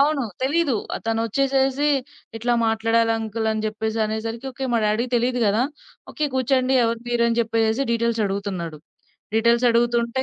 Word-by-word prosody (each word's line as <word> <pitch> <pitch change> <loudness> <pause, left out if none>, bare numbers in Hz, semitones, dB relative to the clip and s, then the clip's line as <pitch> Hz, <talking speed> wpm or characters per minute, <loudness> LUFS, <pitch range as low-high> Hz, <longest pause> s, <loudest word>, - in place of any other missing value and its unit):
అవును. 285 0 +3 0.2
తెలీదు. 290 -1 +1 0.3
తనొచ్చేసేసి 265 +5 +1 0.5
"ఇట్లా 240 +2 0
మాట్లాడాలి 225 +1 +2
అంకల్" 220 0 -3
అని 220 0 -2
జెప్పేసి 220 +1 -2
అనేసరికి 230 +5 -4
మా - - +3
డ్యాడీ‌ 220 +4 +1
తెలీదు 245 +1 0
గదా! 210 +4 +2 0.5
ఓకే. 305 - -1
కూర్చోండి. 260 0 +2
ఎవరు 230 0 -1
మీరు 235 -1 +2
అని 230 0 0
జెప్పేసేసి 225 +2 +1
డీటెయిల్స్ 230 -1 0
అడుగుతున్నాడు. 190 -5 -4 0.6
డీటెయిల్స్ 235 +2 +3
అడుగుతుంటే 235 +1 +1
230 Hz, 135 wpm, -22 LUFS, 220-255 Hz, 0.6 s, అవును